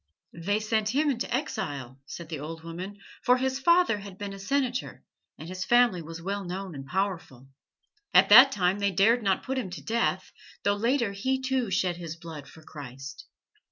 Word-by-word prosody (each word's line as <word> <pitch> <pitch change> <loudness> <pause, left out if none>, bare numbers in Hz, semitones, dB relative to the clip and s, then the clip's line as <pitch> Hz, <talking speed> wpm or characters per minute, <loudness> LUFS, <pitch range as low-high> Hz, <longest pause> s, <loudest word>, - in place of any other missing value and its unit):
"They 205 +4 +1
sent 215 +1 0
him 295 0 +3
into 245 -2 -3
exile," 145 - -3
said 170 +1 -8
the 155 -4 -4
old 160 +2 -7
woman, 180 +5 -7 0.2
"for 250 +1 +4
his 265 +1 -1
father 340 -5 +4
had 195 -2 -10
been 200 -1 -5
a 195 - -9
Senator, 255 +4 -2 0.3
and 155 - -9
his 185 +1 -4
family 240 -7 +4
was 165 +1 -8
well 200 +4 -3
known 185 0 -5
and 135 -2 -8
powerful. 170 -8 -3 0.6
At - - +6
that 270 +2 +10
time 190 -3 +1
they 200 0 +2
dared 220 +6 +3
not 195 -3 +1
put 265 0 -2
him 210 -7 -4
to 180 - -8
death, 225 -5 -1 0.3
though 200 - +3
later 230 +2 +1
he, 260 +7 -1
too, 260 -3 -1
shed 185 -2 0
his 165 -2 -6
blood 160 -4 -9
for 160 - -15
Christ. 135 -3 -9
195 Hz, 190 wpm, -27 LUFS, 165-240 Hz, 0.6 s, that